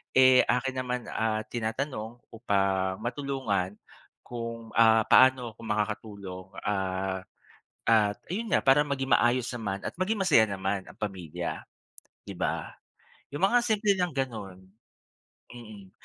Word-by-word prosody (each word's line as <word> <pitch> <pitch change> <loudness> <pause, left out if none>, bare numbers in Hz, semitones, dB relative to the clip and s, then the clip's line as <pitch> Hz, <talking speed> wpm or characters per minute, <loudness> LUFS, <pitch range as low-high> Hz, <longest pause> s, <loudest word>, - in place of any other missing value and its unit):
eh, 130 -1 +7
akin 125 +2 0
naman, 125 -1 -3
ah, 110 -1 -1
tinatanong 120 0 -4
upang, 95 -4 0
matulungan 120 -8 -2 0.5
kung, 115 -1 -7
ah, 110 -1 +6
paano 130 -3 +5
kung 115 - -9
makakatulong, 105 -3 -4 0.2
ah, 95 -1 -2 0.6
at 105 -3 +4 0.2
ayun 225 +2 -3
nga - - +3
para 135 +2 +6
maging 135 -2 -3
maayos 120 0 +3
naman 105 -5 -3
at - - -3
maging 210 +4 0
masaya 115 -12 +5
naman 95 0 -2
ang - - -15
pamilya, 95 -7 -5 0.7
'di - - -7
ba? - - -2 0.6
Yung 145 - -4
mga 245 +5 +4
simple 210 -2 +2
lang 180 -1 0
ganon. 105 -8 -4 0.9
Mm. 105 -5 -12
115 Hz, 125 wpm, -28 LUFS, 100-130 Hz, 0.9 s, eh